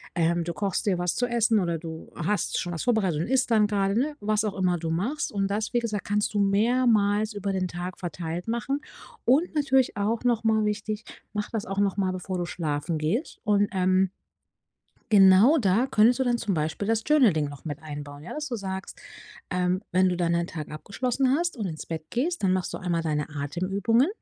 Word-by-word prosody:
ähm, 170 0 +1
du 170 - -4
kochst 200 +3 -2
dir 190 -3 +2
was 175 -1 0
zu 245 - +1
essen, 230 -2 +2
oder 170 -3 0
du 160 -1 -8
hast 200 +5 -1
schon 175 -1 -3
was 165 - -3
vorbereitet 195 -10 +1
und 170 - -2
isst 260 0 +1
dann 215 -2 +4
grade, 200 0 0
ne, 295 +3 -1
was 215 -1 0
auch 210 - -2
immer 180 -2 +1
du 165 0 -4
machst, 235 - -1
und 195 -2 0
das, 210 +2 -2
wie 240 - +3
gesagt, 215 -4 -3
kannst 205 +1 0
du 205 - 0
mehrmals 215 0 +2
über 200 -1 -3
den 185 -1 -1
Tag 175 +1 -5
verteilt 175 0 -5
machen 270 +5 -1 0.4
und 305 +7 +3
natürlich, 265 -3 +2
auch 220 +4 0
noch 235 -2 +2
mal 220 -1 +2
wichtig, 210 +1 -2 0.3
mache 210 -1 -3
das 220 -3 -2
auch 195 +1 -3
noch 200 -2 +2
mal, 190 -2 +1
bevor 185 0 -4
du 175 - -2
schlafen 155 -1 -2
gehst. 165 - -2
Und, 205 -1 +3
ähm 185 0 +2 1.0
genau, 200 +9 +7
da 225 +2 +2
könntest 240 +1 +4
du 265 - +1
dann 240 -1 +1
zum 200 -4 -1
Beispiel 160 +6 -2
das 225 0 +1
Journal-Ding 210 - +4
noch 145 -1 -11
mit 150 0 -5
einbauen, 145 -1 -8
ja, 170 - -8
dass 300 0 -4
du 240 - -3
sagst, 190 -1 -6 0.5
ähm, 180 +1 0
wenn 185 +1 +4
du 180 - -1
dann 170 -1 +1
deinen 170 0 +1
Tag 155 -4 -7
abgeschlossen 250 - -1
hast 345 -3 -1
und 210 - -2
ins 160 -4 -5
Bett 160 -1 -6
gehst, 325 - -1
dann 185 - +3
machst 185 - -2
du - - -4
einmal 175 -3 -1
deine 150 -2 -1
Atemübungen, 185 - 0
200 Hz, 215 wpm, -26 LUFS, 175-225 Hz, 1.0 s, genau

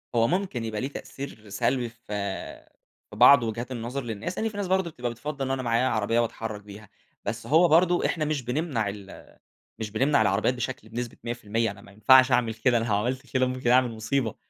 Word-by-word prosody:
هو 115 0 +4
ممكن 180 -9 -1
يبقى 110 -1 -3
ليه 130 - -1
تأثير 135 -6 -9
سلبي 120 +5 0
في 115 0 -24 1.1
في - - -9
بعض 125 +3 +7
وجهات 115 +3 -4
النظر 125 +3 -4
للناس. 115 - -5
يعني 225 - 0
في 205 - -10
ناس 200 -2 -2
برضه 190 -1 +1
بتبقى 125 -4 -4
بتفضّل 140 +4 -5
إن 130 - -2
أنا 135 -1 -1
معايا 120 +1 +2
عربية، 115 +1 +1
واتحرّك 115 -2 -3
بيها. 105 0 -12 0.4
بس 115 +1 -4
هو 160 +7 +5
برضه 175 +2 +4
إحنا 155 -3 0
مش 150 -2 -1
بنمنع 125 -4 -1
ال 100 -1 -10 0.5
مش 110 -2 -4
بنمنع 135 +5 +2
العربيات 105 +4 +2
بشكل 125 -1 -5
بنسبة 120 +1 -5
100%، 115 -2 -1
أنا 100 0 -13
ما 100 - -16
ينفعش 130 +6 +6
أعمل 120 -2 +2
كده، 120 +2 +2
أنا 115 - -1
لو 105 -3 +1
عملت 130 +6 -2
كده 130 -1 +3
ممكن 130 -1 -2
أعمل 125 0 +4
مصيبة. 110 +1 -1
120 Hz, 205 wpm, -26 LUFS, 110-135 Hz, 1.1 s, بعض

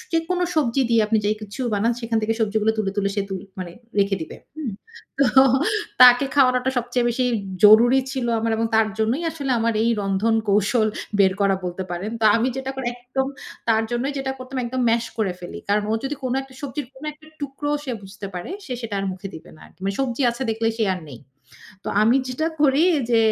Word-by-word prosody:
যেকোনো 335 +2 0
সবজি 275 -4 +1
দিয়ে 230 -1 +5
আপনি 220 +1 +2
যে - - +2
কিছু 210 +4 -8
বানান 220 +4 +2
সেখান 230 -1 -1
থেকে 220 +1 +1
সবজিগুলো 220 0 +2
তুলে, 205 -3 0
তুলে 200 -1 +1
সে 200 - +1
তুল 190 -1 -4 0.2
মানে, 180 -2 -5 0.3
রেখে 195 0 +2
দিবে, - - -8 0.2
হুম। 290 -8 -4 0.5
তো 275 - +5 0.8
তাকে 250 +2 +8
খাওয়ানোটা 255 -2 +3
সবচেয়ে 245 0 -1
বেশি 250 +2 0 0.4
জরুরি 235 +5 +8
ছিল 260 -3 -2
আমার 225 0 0
এবং 225 +1 +1
তার 220 0 +4
জন্যই 230 +8 +1
আসলে 285 -4 -4
আমার 230 0 +1
এই 230 - +2
রন্ধন 200 +3 +1
কৌশল 215 +3 +3 0.3
বের 190 -1 +5
করা 195 -1 +3
বলতে 180 +1 -3
পারেন। 180 +5 -3
তো 220 - +1
আমি 235 +3 +1
যেটা 265 0 -3
করি, 265 -2 -4
একদম 250 +2 -2 0.4
তার 220 -1 +4
জন্যই 245 +4 -1
যেটা 265 0 -2
করতাম 255 +1 -6
একদম 255 +2 -2
ম্যাস 230 0 +2
করে 205 -4 +1
ফেলি। 175 - -7
কারণ 205 +1 +2
ও - - +2
যদি 275 +2 -2
কোন 255 -1 -1
একটা 265 -1 -15
সবজির 285 0 -4
কোন 265 +3 -12
একটা 305 +1 -20
টুকরো 285 +1 -4
সে 260 - -3
বুঝতে 195 +1 -8
পারে, 180 - -5 0.2
সে 260 - -5
সেটা 225 -3 -4
আর 195 - -2
মুখে 190 +1 -7
দিবে 160 - -11
না - - -19
আর। - - -20
মানে 195 +1 -1
সবজি 265 0 -1
আছে 235 +2 -5
দেখলে 225 +1 -1
সে - - +1
আর 180 - -7
নেই। 130 -5 -10 0.7
তো - - -7
আমি 225 +4 +4
যেটা 255 +5 -2 0.2
করি 280 +1 +4 0.3
যে, 230 - +5
230 Hz, 210 wpm, -22 LUFS, 205-265 Hz, 0.8 s, তাকে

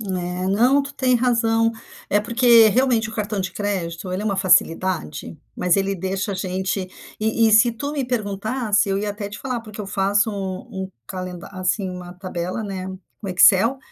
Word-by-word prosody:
É. 180 -3 -3
Não, 240 +9 +4
tu 280 0 -7
tem 255 -2 +2
razão, 230 -2 +2 0.4
é 205 - +3
porque, 235 0 +5
realmente, 240 -1 +2
o - - -9
cartão 210 -1 -2
de 185 - -3
crédito, 185 -3 -3
ele 185 +3 -2
é - - -5
uma 200 -2 0
facilidade, 180 -4 +1 0.2
mas 180 0 +2
ele 195 0 +1
deixa 190 +2 -2
a - - -3
gente 185 0 -2 0.3
e 220 +1 +2
e - - +2
se 230 +2 +6
tu 280 +5 -4
me 280 -3 -1
perguntasse, 215 -1 0
eu 195 - 0
ia 205 +1 -2
até 205 0 -5
te 205 - -9
falar, 255 -3 -3
porque 215 -2 -9
eu 205 - -5
faço 200 +3 +1
um 190 -1 -5
um 190 - -9 0.2
calenda 185 0 -6
assim, 185 +1 -1
uma 180 -1 -8
tabela, 180 +2 -4
né, 190 -3 -5 0.3
no 205 - -6
Excel, 190 +7 +5
200 Hz, 190 wpm, -22 LUFS, 185-225 Hz, 0.4 s, se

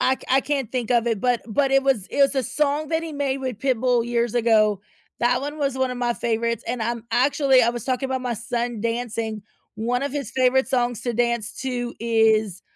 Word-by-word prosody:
I 260 - +3
c - - -17
I 265 - +5
can't 275 -4 -2
think 250 -3 -2
of 240 -1 +3
it, 225 -4 0
but 245 -2 +1
but 270 +5 +1
it 270 0 +4
was 255 -9 +1
it - - -5
was 275 +1 +3
a 265 - +1
song 290 +3 -1
that 320 0 0
he 325 -2 -6
made 275 -2 -1
with 255 -5 -4
Pitbull 250 -2 +1
years 240 -1 -1
ago, 215 -4 +3 0.4
that 245 +1 +2
one 295 +2 -5
was 275 -3 -1
one 260 -1 0
of 250 - -5
my 240 -1 0
favorites, 230 -1 -1
and, 245 0 -3
um, 230 0 -2
actually, 265 0 +4
I 230 - +3
was 235 -2 -3
talking 260 0 -1
about 260 -1 -2
my 250 -1 -2
son 235 0 -3
dancing, 230 -2 -3 0.3
one 240 +4 -1
of 285 - -2
his 275 -6 -4
favorite 260 0 +3
songs 245 -2 0
to 240 - -1
dance 235 -2 0
to 245 -2 -3
is 220 -4 +2
245 Hz, 225 wpm, -23 LUFS, 230-265 Hz, 0.4 s, I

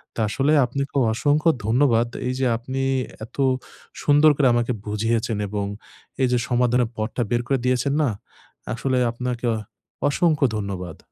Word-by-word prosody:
তা - - -2
আসলে 140 +7 +1
আপনাকে 140 +2 -4 0.2
অসংখ্য 145 +7 +2 0.2
ধন্যবাদ। 120 0 +3 0.2
এই 125 - 0
যে 135 - +1
আপনি 130 +3 -4 0.4
এত - - -20 0.7
সুন্দর 145 +1 +6
করে 140 - +4
আমাকে 120 +1 +1
বুঝিয়েছেন 115 +2 -1
এবং 100 0 -2 0.6
এই 130 - +4
যে 125 - +3
সমাধানের 125 -1 +2
পথটা 110 +3 -2
বের 120 0 +2
করে 135 0 +1
দিয়েছেন 125 +2 +1
না, 140 - +2 0.6
আসলে 130 +2 -1
আপনাকে 125 0 -4
অ - - -2 0.5
অসংখ্য 155 -1 +2
ধন্যবাদ। 95 -5 -5
125 Hz, 145 wpm, -23 LUFS, 115-140 Hz, 0.7 s, সুন্দর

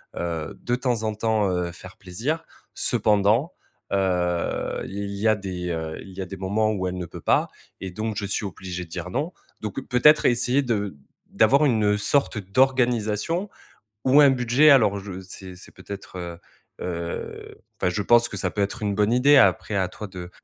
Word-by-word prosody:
heu - - -6
heu, 80 -2 -4
de 120 - +1
temps 125 -3 -1
en 110 0 -1
temps, 110 -2 +1
heu, 90 -1 -1
faire 95 +2 -12
plaisir. 120 - -3 0.3
Cependant, 110 - +2 0.4
heu, 90 -3 0
il 100 +1 -5
y 105 +3 0
a 110 - +5
des, 90 -3 -5
heu 80 -1 -4
il 95 - -11
y - - -3
a - - -3
des 95 +1 -8
moments 105 +3 0
où 95 -3 -2
elle 90 - -3
ne 90 - -4
peut - - -10
pas - - +2 0.3
et 95 - -5
donc 110 +3 -3
je 105 - -2
suis 100 +1 -2
obligée 90 -1 -6
de - - -22
dire, 85 +1 -5
non». 145 - -2 0.3
Donc 105 +3 -4
peut-être 150 +5 +5
essayer 125 +3 +3
de 105 - -2 0.3
d'avoir 135 +7 +4
une, 115 -6 +2
heu, 105 0 +3
sorte 130 +3 +1
d'organisation 125 - +1 0.6
ou 135 +3 +6
un 145 - +8
budget. 125 +3 +4
Alors 110 -8 +5
je 95 -1 -7
c'est 95 0 -10
c'est 90 - -14
peut-être, 100 -2 -9
heu 85 -1 -6 0.4
heu, 85 -1 -5 0.2
enfin - - +2
je 95 +4 -1
pense 120 +3 +4
que - - -7
ça 95 -1 -1
peut 105 - -4
être 100 +4 -2
une 100 -1 0
bonne 105 +2 +2
idée 140 +4 +5
après, 100 -1 +3
à 95 -2 +1
toi 105 - -8
de 90 -2 -8
105 Hz, 195 wpm, -24 LUFS, 95-120 Hz, 0.6 s, un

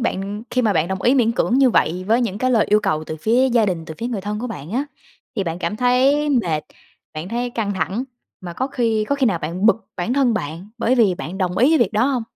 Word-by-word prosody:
bạn 205 -1 -3
khi 250 - +1
mà 215 - +2
bạn 165 -2 +1
đồng 190 -1 -3
ý 245 - +4
miễn 235 -4 +3
cưỡng 245 +2 +1
như 265 -2 +5
vậy 180 -3 +1
với 230 +3 +3
những 210 -5 -2
cái 255 +2 +1
lời 230 -4 +3
yêu 210 +1 +4
cầu 155 -7 -1
từ 155 - -6
phía 235 +10 +2
gia 235 -3 +3
đình, 175 -4 -2
từ 160 - -8
phía 235 - -3
người 235 -5 -3
thân 210 +2 -4
của 245 - -4
bạn 170 - -7
á, 255 +7 -1 0.5
thì 195 - 0
bạn 165 0 -3
cảm 210 +3 -3
thấy 260 +5 +3
mệt, 170 - +1 0.5
bạn 155 +3 -5
thấy 240 +3 -2
căng 225 -4 -2
thẳng, 205 +6 -2 0.4
mà 175 -2 -7
có 255 +9 -2
khi 230 -5 0
có 280 - +2
khi 275 -2 +1
nào 190 -7 +1
bạn 170 +6 -2
bực 225 0 +2
bản 185 +7 -2
thân 260 -4 +2
bạn 165 +1 -5
bởi 235 +2 +2
vì 220 -7 +3
bạn 185 0 -7
đồng 180 -1 -1
ý 255 +6 +5
với 320 - +4
việc 225 -4 +2
đó 215 +3 +2
hông? 260 -3 0
220 Hz, 270 wpm, -20 LUFS, 185-245 Hz, 0.5 s, như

